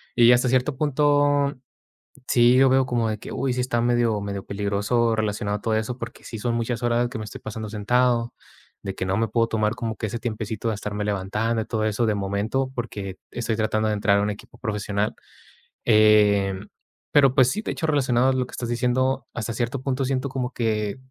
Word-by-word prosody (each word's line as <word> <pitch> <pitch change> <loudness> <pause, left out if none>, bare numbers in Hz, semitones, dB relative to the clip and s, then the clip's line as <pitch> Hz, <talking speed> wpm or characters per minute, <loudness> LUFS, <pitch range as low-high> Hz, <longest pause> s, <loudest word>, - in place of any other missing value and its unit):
Y 120 0 +7
hasta 125 +1 +2
cierto 130 +2 +1
punto, 145 0 +2 0.7
sí, 120 0 +5
yo 135 +1 +6
veo 130 0 +4
como 120 -3 0
de 110 - -2
que, - - -9
uy, 135 -1 -1
sí 125 - -3
está 125 -2 0
medio 120 -3 +1
medio 100 -1 -5
peligroso 105 +4 0
relacionado 105 -1 -1
a - - -14
todo 110 - -1
eso, 110 +3 -2
porque 115 -1 -8
sí 115 - -7
son 120 +2 -1
muchas 115 +1 -2
horas 120 0 +1
que 120 - -6
me 110 - -5
estoy - - -9
pasando 110 0 -6
sentado. 120 +3 +1 0.5
De 95 -1 -4
que - - -3
no 95 +1 0
me 110 +1 0
puedo 115 +1 +2
tomar 110 -1 0
como 115 -3 -3
que 110 - -3
ese 115 +2 -4
tiempecito 110 -1 -4
de 110 - 0
estarme 105 0 -4
levantando 105 +3 -1
y - - -5
todo 110 -2 -1
eso 110 +2 0
de 110 -2 +1
momento. 100 +7 -1
Porque 100 -5 -5
estoy 115 -2 -2
tratando 110 0 0
de 110 - +1
entrar 100 -1 +2
a - - +1
un 105 - 0
equipo 105 +3 -9
profesional. 105 -3 -2 0.7
Eh, 105 -3 +5 0.6
pero, 135 -3 +5
pues, 130 -2 +5
sí, 210 +9 -2
de - - -3
hecho, 160 - -3
relacionado 130 -4 +2
a - - +2
lo 130 -1 0
que - - -15
estás 120 - -5
diciendo, 125 +2 0
hasta 115 -1 -3
cierto 120 +3 -2
punto, 135 0 -1
siento 135 +1 -1
como 130 -1 -3
que, 110 -2 -1
115 Hz, 215 wpm, -24 LUFS, 105-125 Hz, 0.7 s, Y